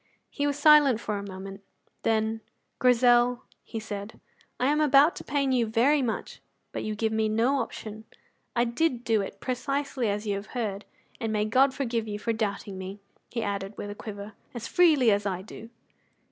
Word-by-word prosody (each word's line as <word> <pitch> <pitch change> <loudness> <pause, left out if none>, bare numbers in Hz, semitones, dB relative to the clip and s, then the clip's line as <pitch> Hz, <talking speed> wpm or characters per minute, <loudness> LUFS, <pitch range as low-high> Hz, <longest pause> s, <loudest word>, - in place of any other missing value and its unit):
He 285 0 -1
was 285 0 -1
silent 290 -5 +6
for 210 -3 -3
a - - -6
moment. 195 0 -8 0.4
Then, 220 0 0 0.4
"Grizel," 245 0 +4 0.2
he 225 - -6
said, 210 0 -7 0.4
"I 250 - +1
am 300 +3 +3
about 290 +2 +5
to - - -7
pain 275 -1 0
you 240 -3 +2
very 255 +7 +3
much, 235 -4 -3 0.3
but - - -4
you 215 0 -3
give 220 +1 0
me 220 0 +1
no 235 +6 +2
option. 220 -2 -6 0.5
I 235 - +3
did 245 +1 0
do 225 -3 +2
it 195 0 -7
precisely 270 -1 -2
as 205 +2 -2
you 205 - 0
have 200 +2 -8
heard. 210 -4 -3 0.3
And 225 -1 -2
may 210 -1 +1
God 260 +5 +4
forgive 230 -4 -2
you 205 -1 -3
for 230 +2 -1
doubting 200 -3 -3
me," 190 +2 -7 0.3
he 230 - -3
added 200 0 -4
with 205 - -5
a - - -4
quiver, 205 0 -8 0.2
"as 235 -1 -5
freely 305 -10 +5
as 205 0 +1
I 185 -1 -3
do." 225 +2 -11
225 Hz, 190 wpm, -27 LUFS, 210-255 Hz, 0.5 s, silent